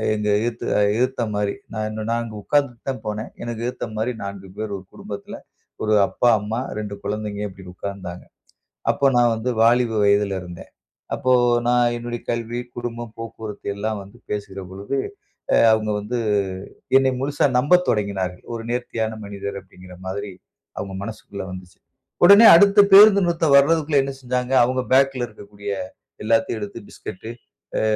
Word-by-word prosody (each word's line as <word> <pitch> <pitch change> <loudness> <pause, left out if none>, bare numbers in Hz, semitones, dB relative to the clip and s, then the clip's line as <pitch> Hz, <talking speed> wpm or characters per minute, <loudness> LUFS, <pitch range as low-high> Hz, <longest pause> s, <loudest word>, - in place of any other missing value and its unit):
எங்க 105 0 -2
எதுத்துல 115 -1 -1 0.2
எதுத்த 125 +1 0
மாரி. 105 -1 -1 0.2
நான் 110 -1 -3
நான் 115 +2 -1
அங்கே 110 -2 -7
உட்காந்துட்டு 140 -4 0
தான் 130 -5 -4
போனேன். 105 +2 -4
எனக்கு 120 -1 -5
எதுத்த 125 - -4
மாரி 110 +3 0
4 100 -1 -7
பேர் 110 -1 -4
ஒரு 95 - -13
குடும்பத்ல. 100 -1 -8 0.5
1 110 0 +1
அப்பா, 120 - +1
அம்மா, 110 +3 -3
2 105 -1 -5
குழந்தைங்க 105 0 -4
இப்டினு 95 -1 -12
உக்கார்ந்தாங்க. 95 -3 -7 0.7
அப்ப 140 - +2
நான் 120 -1 +4
வந்து 110 +3 -2
வாலிப 120 +1 +4
வயதில 100 -1 +2
இருந்தேன். 90 -1 -10 0.5
அப்போ 130 - 0 0.4
நான் 120 -1 +3
என்னுடைய 120 0 -5
கல்வி, 120 +1 -3 0.2
குடும்பம், 120 -1 -5
போக்குவரத்து 110 -3 -8
எல்லாம் 105 +1 -3
வந்து 100 +5 -16
பேசுகிற 100 -2 -4
பொழுது, 100 +8 -4 0.6
அ - - +6 0.2
அவுங்க 110 -1 +1
வந்து 110 +4 -3 0.8
என்னை 135 0 +3
முழுசா 145 +2 +1
நம்பத் 180 +8 +4
தொடங்கினார்கள். 95 -4 -1
"ஒரு 115 - -6
நேர்த்தியான 115 -2 -2
மனிதர்" 100 0 -6
அப்டின்கிற 90 -1 -15
மாதிரி, 100 +1 -4 0.5
அவுங்க 95 -1 -5
மனசுக்குள்ள 100 -2 -7
வந்துச்சு. 90 -1 -10 0.5
உடனே 200 +5 +9
அடுத்த 200 +4 +6
பேருந்து 200 0 +9
நிறுத்தம் 165 -4 +2
வர்றதுக்குள்ள 150 0 +3
என்ன 135 0 -4
செஞ்சாங்க, 125 0 -2
அவங்க 130 +1 0
பேக்ல 135 -2 +3
இருக்கக்கூடிய 100 -1 -9 0.5
எல்லாத்தையும் 115 0 +1
எடுத்து 105 +3 -6
பிஸ்கட்டு, 110 +5 -8 0.5
ஆ - - 0
110 Hz, 150 wpm, -22 LUFS, 100-125 Hz, 0.8 s, உடனே